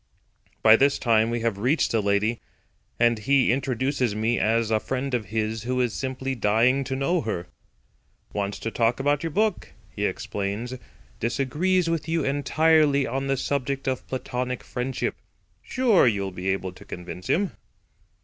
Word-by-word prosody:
By 110 0 +8
this 140 +2 +3
time 115 -1 +3
we 120 0 -2
have 115 -3 -1
reached 130 +9 +2
the 115 - +2
lady, 105 +3 +1 0.6
and 120 -1 +3
he 135 +3 +3
introduces 130 -2 0
me 110 +2 +1
as 115 +2 +1
a 110 - +3
friend 130 +3 -3
of 120 -3 0
his 110 +2 -2
who 125 +2 -2
is 120 -3 +1
simply 130 0 -3
dying 120 +4 +2
to 130 +1 -2
know 160 +6 +1
her. 105 -6 -3 0.9
"Wants 100 -1 -2
to 115 - -3
talk 115 +2 +1
about 145 +1 +1
your 165 - -2
book," 210 +4 0 0.2
he - - -2
explains. 105 +5 -4 0.5
"Disagrees 150 +10 +1
with 165 -2 -1
you 165 -2 +1
entirely 145 +1 +3
on 135 +3 -2
the 135 0 +1
subject 140 0 -2
of 130 -1 -2
platonic 125 -1 -3
friendship. 125 +1 -3 0.4
Sure 240 - +3
you'll 100 -4 0
be 90 +1 -4
able 95 -1 -1
to 90 - -14
convince 90 +1 -8
him." 195 +2 +1
125 Hz, 160 wpm, -25 LUFS, 110-140 Hz, 0.9 s, By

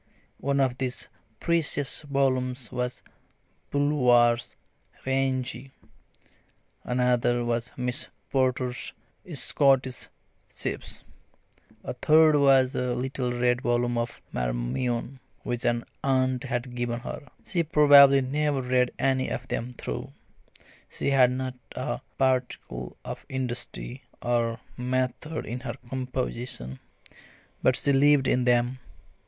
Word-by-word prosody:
One 140 0 0
of 130 -2 +1
these 130 -2 -3 0.3
precious 150 -5 0
volumes 130 -3 0
was 125 0 -3 0.7
Bulwer's 125 -5 +3 0.5
"Rienzi"; 130 -1 -1 1.1
another 125 -1 +1
was 120 0 -1
Miss 125 -1 -2 0.2
Porter's 130 -2 0 0.4
"Scottish 130 -1 +2 0.5
Chiefs"; - - -5 0.8
a - - -4
third 155 +4 +5
was 135 -2 +5
a 125 -1 -1
little 130 -1 -2
red 125 0 +1
volume 120 0 +1
of 120 0 -3
"Marmion" 90 - -2 0.2
which 120 0 -3
an 120 0 +1 0.2
aunt 130 -1 +1
had 125 -1 -3
given 120 -1 -2
her. 145 - -7 0.2
She 175 -4 0
probably 145 -3 +7
never 140 +1 0
read 125 0 +2
any 130 -1 +1
of - - -4
them 125 +1 -3
through - - -5 0.8
she - - -1
had 130 -2 +6
not 130 0 -3 0.2
a 125 -1 -3 0.2
particle 125 - -1
of - - -6
industry 125 0 -4 0.2
or 120 -1 0 0.2
method 130 +5 -2
in 120 +3 -4
her 120 -2 -5
composition 125 - -4 0.8
but 130 - +4
she 140 - +2
lived 140 0 +5
in 125 -1 +2
them. 120 +1 +2
125 Hz, 110 wpm, -27 LUFS, 120-135 Hz, 1.1 s, probably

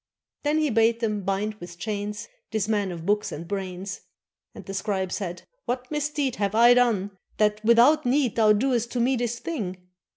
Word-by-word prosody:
Then 295 +1 +1
he 305 -3 +1
bade 225 +1 +3
them 210 -3 -1
bind 195 +3 -1
with 175 0 -10
chains 210 +1 -4 0.2
This 215 -3 -1
man 205 -3 0
of 170 -2 -7
books 210 +2 +1
and 165 +3 -7
brains; 190 0 -5 0.5
And - - -10
the 195 - -6
scribe 190 -2 -2
said: 180 -3 -4 0.2
"What 250 +2 -3
misdeed 290 -3 -1
Have 200 0 -1
I 235 +2 +7
done, 230 -5 +2 0.3
that, 210 0 +1
without 240 +7 +5
need, 255 -2 +1
Thou 220 -2 +5
doest 235 +1 0
to 250 - -1
me 255 +3 +2
this 240 -1 -2
thing?" 215 - -4
215 Hz, 185 wpm, -25 LUFS, 195-245 Hz, 0.5 s, I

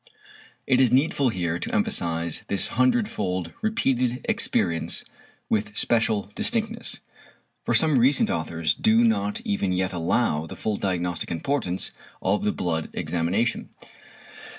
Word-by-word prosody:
It 130 -1 +3
is 125 -3 +4
needful 135 0 +3
here 85 -5 -2
to - - -3
emphasise 85 -1 +1
this 100 - 0
hundred 130 - +2
fold 90 - -3
repeated 130 - 0
experience 80 -1 0 0.4
with 105 0 -1
special 110 -3 +1
distinctness, 230 0 0 0.6
for - - 0
some 155 -5 +4
recent 130 +3 +3
authors 80 0 0
do 110 +2 +3
not 105 -3 +1
even 100 -2 -1
yet 95 +1 0
allow 80 -2 0
the - - -8
full 105 -2 -2
diagnostic 90 -3 -2
importance 95 - -2 0.3
of 100 +3 0
the 105 - +2
blood 80 -5 -2
examination. 90 +8 -1
105 Hz, 125 wpm, -25 LUFS, 85-125 Hz, 0.6 s, is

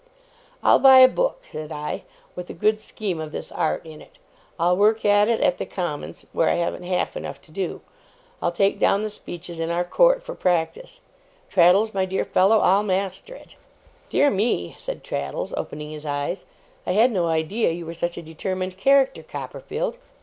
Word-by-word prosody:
'I'll - - +6
buy 265 -1 +8
a 255 - +10
book,' - - -1
said 155 0 -7
I, 150 0 -4 0.3
'with 180 0 -7
a - - -7
good 215 +4 +2
scheme 205 -5 -4
of 155 -1 -6
this - - -7
art 160 - -1
in 155 -1 -11
it; - - -18 0.4
I'll 175 +2 +3
work 215 +3 +2
at 205 +1 +4
it 230 - +1
at 280 -2 +2
the - - -2
Commons, 170 -6 -5
where 165 - +2
I - - +2
haven't 170 +1 -2
half 180 0 -1
enough - - -6
to 160 - -19
do; 185 +2 -4 0.6
I'll 175 - +1
take 195 +3 +1
down 200 +2 +3
the 215 - -3
speeches 175 -4 -8
in 165 0 -2
our 170 +1 0
court - - +3
for - - -6
practice 185 - -1 0.5
Traddles, 190 +5 +4
my 190 -1 +1
dear 190 +1 -2
fellow, 195 +4 +4
I'll 195 +2 +4
master 195 - -2
it!' - - -15 0.5
'Dear 285 - +3
me,' 200 - 0
said - - -6
Traddles, 70 0 -4
opening 150 0 -5
his 150 -1 -8
eyes, 145 +6 -3 0.4
'I 180 - +1
had 230 +6 +4
no 180 -6 0
idea 165 +8 0
you 170 +1 -4
were 165 - -6
such 170 +1 -3
a 170 - -6
determined 185 +3 -4
character, 270 +4 +3
Copperfield! 485 +1 -5
185 Hz, 190 wpm, -23 LUFS, 170-220 Hz, 0.6 s, a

